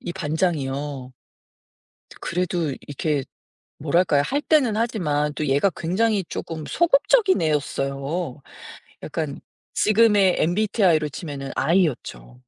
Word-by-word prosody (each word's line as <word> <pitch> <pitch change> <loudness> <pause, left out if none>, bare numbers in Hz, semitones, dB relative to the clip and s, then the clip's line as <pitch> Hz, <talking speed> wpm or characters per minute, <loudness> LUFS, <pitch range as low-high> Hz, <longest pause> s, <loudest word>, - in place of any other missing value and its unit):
이 175 - -5
반장이요. 145 -6 -2 1.1
그래도 175 -3 -1 0.2
이렇게 145 -1 -1 0.5
뭐랄까요. 155 0 +2
할 285 - -1
때는 260 -9 +2
하지만 150 -11 0
또 150 - -2
얘가 140 +8 +2
굉장히 195 +3 0
쪼금 160 -2 -6
소극적인 375 - +3
애였어요. 140 0 -2 0.6
약간 150 -2 -4 0.4
지금의 210 -3 +4
MBTI로 175 -4 +2
치면은 140 -3 -6
I였죠. 140 - 0
160 Hz, 255 characters per minute, -23 LUFS, 145-195 Hz, 1.1 s, 지금의